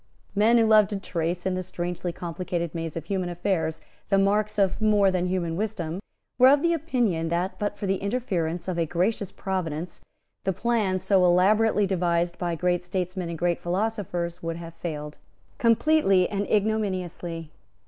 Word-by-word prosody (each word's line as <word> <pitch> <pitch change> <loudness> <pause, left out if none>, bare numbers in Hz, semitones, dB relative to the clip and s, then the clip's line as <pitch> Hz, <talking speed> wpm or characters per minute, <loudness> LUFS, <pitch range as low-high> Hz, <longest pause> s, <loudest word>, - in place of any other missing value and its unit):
Men 220 +4 +4
who 230 - +5
loved 215 -2 +5
to 205 -2 -3
trace, 175 -1 -3
in 190 - +1
the 185 - -1
strangely 175 -1 -4
complicated 170 -1 -4
maze 165 -1 -4
of 160 - -5
human 185 -1 -2
affairs, 170 -3 -1 0.3
the 195 - +4
marks 210 +2 +2
of 195 0 +1
more 205 -2 +4
than 180 -1 0
human 175 -3 -1
wisdom, 185 -4 -3 0.4
were 255 - +8
of 285 +3 +4
opinion 250 - 0
that, 175 +3 -2
but 205 0 -2
for - - -4
the 195 0 +1
interference 185 -7 -2
of 180 -2 -2
a 165 - +1
gracious 185 +4 -1
Providence, 175 -3 -4 0.4
the 190 - 0
plan 215 -2 +1
so 190 0 +2
elaborately 205 +4 +4
devised 175 -2 0
by 175 -2 -1
great 180 +1 0
statesmen 180 0 -3
and 170 - -4
great 175 +1 0
philosophers 180 -2 -2
would 165 0 -3
have 165 0 -8
failed 150 -3 -6 0.4
completely 230 - +4
and 200 -1 -3
ignominiously. 185 -6 -1
185 Hz, 165 wpm, -26 LUFS, 170-205 Hz, 0.4 s, were